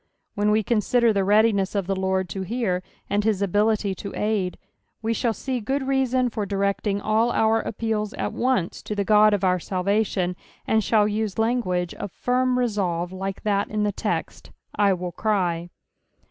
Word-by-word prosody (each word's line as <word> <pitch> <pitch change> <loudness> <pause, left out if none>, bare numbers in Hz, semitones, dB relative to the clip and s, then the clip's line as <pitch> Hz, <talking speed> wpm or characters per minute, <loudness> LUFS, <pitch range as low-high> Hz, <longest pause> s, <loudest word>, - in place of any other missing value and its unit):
When 205 +1 +1
we 215 +1 +3
consider 235 +1 +2
the 200 -1 +1
readiness 205 -1 +3
of 200 -2 0
tbe 195 +1 -1
Lord 190 0 0
to 195 - -4
hear, 190 -2 -1 0.3
and 205 +1 0
his 205 -2 +1
ability 205 +1 +1
to 200 +1 -7
aid, 210 -4 -1 0.5
we 225 +1 +1
shall 230 +1 0
see 250 +3 -3
KOod 265 +5 -2
reason 260 -2 +2
for 215 -1 -2
directing 200 0 0
sU - - -14
our 225 0 +2
appeals 215 -1 -2
at - - -3
once 250 -9 0
to 210 - -5
the 200 - 0
Ood 210 0 +5
of 200 - -4
our 180 -1 +3
salvation, 185 0 0 0.3
and 220 - +2
Bhall 215 0 +3
use 215 -2 -2
language 220 -7 0
uf 200 - -5
firm 250 +3 +1
resolve 185 -8 -1
like 195 +1 -5
that 200 -1 0
in 215 -1 -1
the 205 - +1
text, - - -4 0.2
" - - -51
I 205 -1 +3
will 180 -1 -4
cry." 175 -5 -1
210 Hz, 180 wpm, -24 LUFS, 190-225 Hz, 0.5 s, Ood